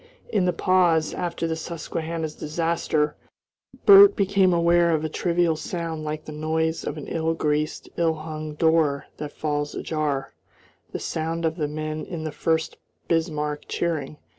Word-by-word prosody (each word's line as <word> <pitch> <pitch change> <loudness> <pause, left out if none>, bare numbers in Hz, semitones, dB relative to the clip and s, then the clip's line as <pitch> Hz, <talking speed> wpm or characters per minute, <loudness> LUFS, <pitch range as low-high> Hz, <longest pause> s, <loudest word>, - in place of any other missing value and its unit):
In 205 -5 +1
the 180 - +3
pause, 175 -3 +2
after 170 -1 -3
the 165 -1 -1
Susquehanna's 160 -1 -4
disaster 155 -1 -1 0.7
Bert 400 0 +9
became 195 -1 +3
aware 170 0 +4
of 155 0 -2
a - - -2
trivial 170 0 +1
sound 165 -1 -4
like 155 0 -4
the - - -7
noise 160 +1 -1
of 150 - -4
an 150 - -6
ill 165 0 -1
greased, 150 0 -1
ill 165 -1 +2
hung 155 -1 -6
door 160 -3 +2
that 150 -1 -5
falls 145 -1 -2
ajar 145 -4 -2 0.6
the - - -3
sound 165 +1 -3
of 160 0 0
the 155 -3 -1
men 155 +1 -4
in 165 -3 -5
the 155 - -3
Furst 160 +1 -1 0.3
Bismarck 150 -3 -1
cheering. 155 -4 -2
160 Hz, 155 wpm, -24 LUFS, 155-170 Hz, 0.7 s, Bert